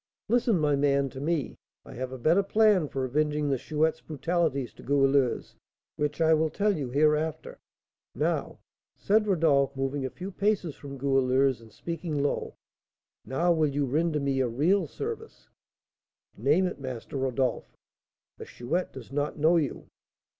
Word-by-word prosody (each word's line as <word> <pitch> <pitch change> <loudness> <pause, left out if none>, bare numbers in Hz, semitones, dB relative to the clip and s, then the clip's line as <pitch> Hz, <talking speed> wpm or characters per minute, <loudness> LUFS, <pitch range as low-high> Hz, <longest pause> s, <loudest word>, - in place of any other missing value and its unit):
"Listen, 235 -3 +3
my 150 -2 +2
man, 140 -1 +2
to 130 - -8
me; 155 -2 -2 0.3
I - - -11
have 130 +1 -5
a 130 - -6
better 160 +10 +3
plan 200 -4 +3
for 135 -1 -3
avenging 150 +2 0
the 135 - +1
Chouette's 160 +3 0
brutalities 155 -5 -1
to - - -15
Goualeuse, 135 -2 +1 0.4
which 150 +1 -2
I 160 -1 +4
will 160 0 +2
tell 205 +5 +1
you 140 -6 -3
hereafter. 155 - 0 0.6
Now," - - -1 0.4
said 215 +1 +2
Rodolph, 145 -7 +2
moving 135 +1 -2
a 130 - -2
few 185 +8 -7
paces 200 -5 0
from 140 -1 -9
Goualeuse, 135 -1 +2
and 110 -1 -16
speaking 165 +4 -4
low, 140 0 -1 0.7
"Now, 170 +7 +1
will 155 -2 +2
you 140 0 0
render 155 +4 0
me 140 -1 0
a 130 - +2
real 160 +10 +1
service?" 450 - -7 0.9
"Name 155 +7 +2
it, 180 - -4
Master 130 -1 -7
Rodolph." 130 -2 -1 0.7
"The - - -7
Chouette 150 +10 -3
does 130 -2 -10
not 145 +2 -2
know 160 +3 +4
you?" 150 -5 -2
150 Hz, 155 wpm, -28 LUFS, 135-170 Hz, 0.9 s, I